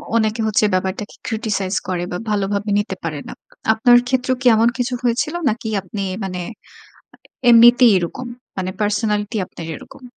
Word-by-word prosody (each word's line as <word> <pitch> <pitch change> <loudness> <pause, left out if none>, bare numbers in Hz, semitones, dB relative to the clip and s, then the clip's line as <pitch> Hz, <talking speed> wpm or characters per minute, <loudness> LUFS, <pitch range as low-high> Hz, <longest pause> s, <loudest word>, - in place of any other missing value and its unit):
অনেকে 220 0 +1
হচ্ছে 215 0 +2
ব্যাপারটাকে 190 +2 -2
criticize 210 -4 -2
করে 180 -2 -2
বা, 180 - -2
ভালোভাবে 205 0 -1
নিতে 205 -2 -3
পারে 155 -3 -3
না। - - -7 0.4
আপনার 240 +2 +5
ক্ষেত্রেও 255 0 0
কি 255 - +2
এমন 230 +2 +4
কিছু 250 0 -1
হয়েছিল 245 +6 0 0.2
নাকি 220 +1 -4
আপনি 200 +2 -6 0.2
মানে 180 -2 -4 0.8
আ 245 - -2
এমনিতেই 240 +1 +7
এরকম? 180 +8 -4 0.3
মানে 185 -1 -2
পার্সোনালিটি 210 +1 0
আপনার 170 - -10
এরকম? 255 - -14
215 Hz, 155 wpm, -19 LUFS, 195-240 Hz, 0.8 s, এমনিতেই